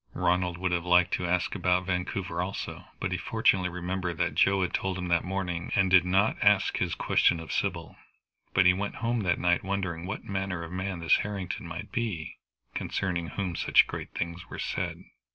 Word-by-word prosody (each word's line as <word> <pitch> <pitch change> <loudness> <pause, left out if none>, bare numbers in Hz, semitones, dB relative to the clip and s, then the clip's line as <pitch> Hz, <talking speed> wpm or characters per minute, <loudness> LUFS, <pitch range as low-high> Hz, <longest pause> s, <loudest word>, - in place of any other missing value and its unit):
Ronald 90 0 +1
would 95 0 -1
have 85 -1 0
liked 90 0 +4
to 90 - 0
ask 90 0 0
about 90 -1 +1
Vancouver 90 -1 -2
also, 95 +2 -5
but - - -2
he - - -1
fortunately 90 -1 +2
remembered 90 -1 -3
what 90 0 0
Joe 95 -1 +3
had 90 - -2
told 95 -1 -1
him 90 -1 -4
that 85 -1 +3
morning, 90 -2 -3
and 95 -1 +3
did 90 -2 +7
not 95 +4 +2
ask - - +4
his - - 0
questions 85 - +3
of 80 -2 -7
Sybil. - - -2 0.6
But 95 - +5
he 90 - +7
went 100 +2 -3
home 120 0 +1
that 90 -5 +1
night 90 0 +2
wondering 95 -3 -3
what 100 - -4
manner 95 -3 -3
of 85 - -8
man 95 -1 -3
this 85 - +4
Harrington 95 -4 -4
might 85 +1 -7
be, 110 -10 -3 0.4
concerning 85 -3 -2
whom 90 -1 -3
such - - +5
great - - -6
things 85 +1 -4
were - - -7
said. - - -3
90 Hz, 195 wpm, -28 LUFS, 85-95 Hz, 0.6 s, did